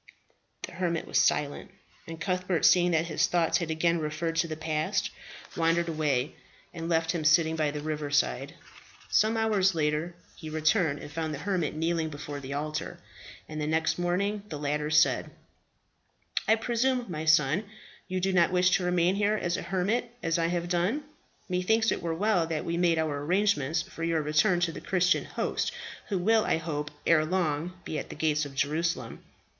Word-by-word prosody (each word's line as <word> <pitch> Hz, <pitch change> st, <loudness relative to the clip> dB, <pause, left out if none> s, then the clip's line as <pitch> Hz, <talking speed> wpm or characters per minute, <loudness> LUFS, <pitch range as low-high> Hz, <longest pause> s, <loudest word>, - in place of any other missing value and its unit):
The -, -, -5 dB
hermit 170 Hz, -2 st, -2 dB
was -, -, +1 dB
silent, 145 Hz, -1 st, +1 dB, 0.4 s
and 165 Hz, 0 st, -7 dB
Cuthbert, 180 Hz, -1 st, 0 dB
seeing 180 Hz, -1 st, +5 dB
that 165 Hz, -1 st, +2 dB
his 165 Hz, -, +1 dB
thoughts 170 Hz, -2 st, +2 dB
had 170 Hz, -2 st, -3 dB
again 170 Hz, +1 st, +1 dB
referred 160 Hz, +2 st, -2 dB
to 165 Hz, +1 st, +2 dB
the 155 Hz, -, -4 dB
past, 155 Hz, -1 st, -1 dB, 0.4 s
wandered 170 Hz, +1 st, +2 dB
away, 150 Hz, -4 st, 0 dB, 0.4 s
and 165 Hz, -1 st, -5 dB
left 165 Hz, -1 st, +2 dB
him 170 Hz, -3 st, -2 dB
sitting 160 Hz, +1 st, +4 dB
by 155 Hz, -2 st, +1 dB
the 145 Hz, 0 st, -5 dB
river 150 Hz, -1 st, -3 dB
side. 65 Hz, -, 0 dB, 0.6 s
Some 220 Hz, +1 st, +3 dB
hours 205 Hz, -4 st, +2 dB
later 155 Hz, +2 st, -1 dB, 0.2 s
he 155 Hz, -, -8 dB
returned, 155 Hz, 0 st, +1 dB
and 145 Hz, -, -9 dB
found 160 Hz, 0 st, -3 dB
the 145 Hz, -, -9 dB
hermit 180 Hz, -7 st, -1 dB
kneeling 165 Hz, 0 st, 0 dB
before 145 Hz, -1 st, -6 dB
the 140 Hz, 0 st, -6 dB
altar; 155 Hz, +1 st, -4 dB, 0.5 s
and 155 Hz, 0 st, -5 dB
the 150 Hz, -, -1 dB
next 160 Hz, +2 st, 0 dB
morning 200 Hz, +4 st, 0 dB
the 150 Hz, -, -5 dB
latter 150 Hz, +1 st, -1 dB
said, 155 Hz, 0 st, +3 dB, 1.2 s
"I 220 Hz, -, +6 dB
presume, 245 Hz, +2 st, 0 dB
my 160 Hz, -3 st, -4 dB
son, 155 Hz, +5 st, +3 dB, 0.4 s
you 185 Hz, 0 st, -2 dB
do 190 Hz, +1 st, 0 dB
not 175 Hz, -1 st, +4 dB
wish 180 Hz, 0 st, +3 dB
to 185 Hz, -, -5 dB
remain 180 Hz, 0 st, +2 dB
here 205 Hz, +1 st, +1 dB
as 175 Hz, -4 st, -1 dB
a -, -, -3 dB
hermit, 195 Hz, +6 st, -1 dB
as 165 Hz, 0 st, +1 dB
I 165 Hz, -, +2 dB
have 175 Hz, 0 st, -2 dB
done? 180 Hz, -, 0 dB, 0.4 s
Methinks 220 Hz, +5 st, +2 dB
it -, -, -2 dB
were 165 Hz, -1 st, -2 dB
well 190 Hz, -2 st, +1 dB
that 160 Hz, -2 st, -3 dB
we 170 Hz, -, -1 dB
made 170 Hz, -1 st, +2 dB
our 150 Hz, -3 st, -1 dB
arrangements 165 Hz, -3 st, +1 dB
for 165 Hz, -, -8 dB
your 165 Hz, -2 st, +1 dB
return 175 Hz, +5 st, +2 dB
to 170 Hz, -1 st, +1 dB
the 155 Hz, -, -8 dB
Christian 185 Hz, -1 st, +2 dB
host, -, -, -2 dB, 0.4 s
who 200 Hz, -, -1 dB
will, 220 Hz, +4 st, +3 dB
I -, -, +1 dB
hope, 150 Hz, -2 st, -4 dB, 0.2 s
ere 160 Hz, -2 st, +4 dB
long 170 Hz, 0 st, -1 dB
be 155 Hz, -, -3 dB
at -, -, -7 dB
the -, -, -7 dB
gates 155 Hz, -1 st, +1 dB
of 135 Hz, -, -13 dB
Jerusalem." 145 Hz, -3 st, -1 dB
165 Hz, 185 wpm, -28 LUFS, 155-180 Hz, 1.2 s, I